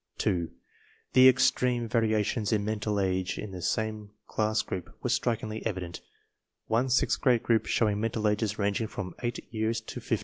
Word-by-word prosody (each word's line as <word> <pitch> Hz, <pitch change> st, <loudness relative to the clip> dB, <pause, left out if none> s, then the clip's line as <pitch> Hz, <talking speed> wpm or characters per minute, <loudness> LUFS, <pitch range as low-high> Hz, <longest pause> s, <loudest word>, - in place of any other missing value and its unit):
2. 85 Hz, -3 st, 0 dB, 0.6 s
The 130 Hz, 0 st, +9 dB
extreme 125 Hz, -2 st, +2 dB
variations 110 Hz, -1 st, +1 dB
in 105 Hz, -2 st, +1 dB
mental 105 Hz, -1 st, -1 dB
age 95 Hz, -1 st, 0 dB
in 105 Hz, -, -6 dB
the 90 Hz, -1 st, -7 dB
same 110 Hz, +1 st, -2 dB, 0.2 s
class 110 Hz, 0 st, 0 dB
group 90 Hz, -, -6 dB
were -, -, 0 dB
strikingly 110 Hz, -2 st, -1 dB
evident, 90 Hz, -5 st, -4 dB, 0.6 s
one 120 Hz, +4 st, +1 dB
sixth 130 Hz, -, +2 dB
grade 125 Hz, -5 st, +3 dB
group 115 Hz, -2 st, +2 dB
showing 105 Hz, -2 st, +1 dB
mental 110 Hz, -1 st, 0 dB
ages 105 Hz, 0 st, 0 dB
ranging 100 Hz, +2 st, 0 dB
from 95 Hz, -4 st, -6 dB
8 120 Hz, -1 st, -2 dB, 0.2 s
years 110 Hz, +1 st, 0 dB
to 110 Hz, -, -8 dB
15. -, -, 0 dB
110 Hz, 165 wpm, -28 LUFS, 105-115 Hz, 0.6 s, The